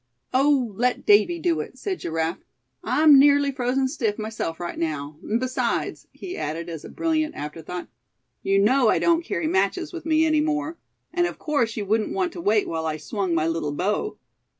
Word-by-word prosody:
"Oh! 265 -4 +3
let 250 +1 0
Davy 210 +12 +5
do 335 -1 0
it," - - -6
said 385 -3 -3
Giraffe; 165 +2 -2 0.4
"I'm 300 -2 +6
nearly 285 0 +5
frozen 260 0 0
stiff 230 -7 -2
myself 215 -7 -4
right 175 -1 -5
now; 150 -2 -3
and 220 +4 -1
besides," 255 0 -2
he 370 0 -7
added 165 +3 -4
as 165 -3 -7
a - - -9
brilliant 315 -2 -1
after 150 +2 -6
thought, 180 +3 -6 0.5
"you 195 0 +2
know 245 +5 +4
I - - +3
don't 335 0 +2
carry 325 - -2
matches 350 0 0
with 335 -2 -7
me 315 0 +4
any 310 -1 +3
more. 305 +1 -2 0.3
And 350 0 +2
of - - -7
course 280 -8 -1
you 210 - -2
wouldn't 215 +2 0
want 370 -3 0
to 345 - -6
wait 210 -6 +2
while 160 -1 -2
I 155 -1 -2
swung 190 0 -2
my 155 -1 +1
little 165 -3 -2
bow." 210 - -1
245 Hz, 195 wpm, -24 LUFS, -, 0.5 s, I'm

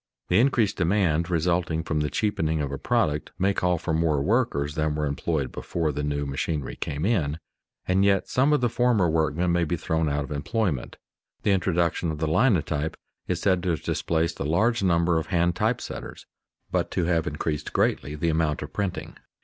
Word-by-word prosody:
The 90 - +4
increased 120 -5 +2
demand 85 -2 +1
resulting 85 -1 0
from 80 -1 -1
the 75 0 0
cheapening 80 -7 0
of 70 -2 -2
a 70 - -4
product 75 0 0
may 100 +2 +2
call 90 -2 +1
for 80 0 -3
more 80 -2 +2
workers 75 - +1
than 75 -1 0
were 75 0 -1
employed 70 -1 -1
before 80 -3 -2
the 75 - -3
new 75 0 -1
machinery 70 +1 -3
came 75 +3 -3
in, 80 -9 +1 0.5
and 95 +1 +3
yet 100 -1 +3
some 135 +4 +2
of 150 - +3
the 120 - +3
former 115 -5 +2
workmen 80 +2 +1
may 85 0 +2
be 85 +2 -1
thrown 80 0 0
out 75 0 -1
of 70 - -9
employment. 75 - -2 0.5
The 105 - +3
introduction 85 -3 +1
of 80 - -3
the 80 - -1
linotype 80 - +1 0.3
is - - -1
said 95 -3 +2
to 90 - -2
have 80 - -1
displaced 85 +1 -1
a - - -1
large 110 - +2
number 85 -2 +2
of 80 - -5
hand 85 0 +1
type - - +1
setters, - - -8 0.5
but - - 0
to - - -1
have 85 -1 +1
increased 75 -1 -3
greatly 70 +4 0
the 80 +3 0
amount 80 -2 0
of - - -9
printing. 100 -3 -3
80 Hz, 195 wpm, -25 LUFS, 75-95 Hz, 0.5 s, The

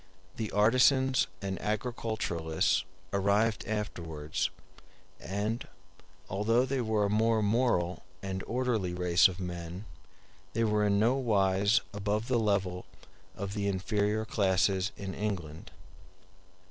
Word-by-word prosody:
The 110 -2 -3
artisans 130 +5 +4 0.2
and 95 -1 -3
agriculturists 105 -7 -1 0.3
arrived 100 +3 +1
afterwards; 85 -8 -3 0.7
and, 105 +5 -3 0.6
although 115 +6 +2
they 130 0 -1
were 110 -3 +1
a - - 0
more 110 +1 +2
moral 100 -5 +1 0.2
and 95 0 -4
orderly 115 -7 -1
race 90 +1 +5
of 95 -1 -7
men, 90 +1 -6 0.7
they 115 - +1
were 105 -1 +2
in 100 0 +2
nowise 105 -3 +3
above 105 +3 -2
the 125 -2 +3
level 95 -4 0 0.5
of 100 0 -5
the 100 -1 -1
inferior 105 +2 0
classes 95 -1 +1
in 95 -1 -5
England. 85 -7 -4
105 Hz, 110 wpm, -30 LUFS, 95-110 Hz, 0.7 s, race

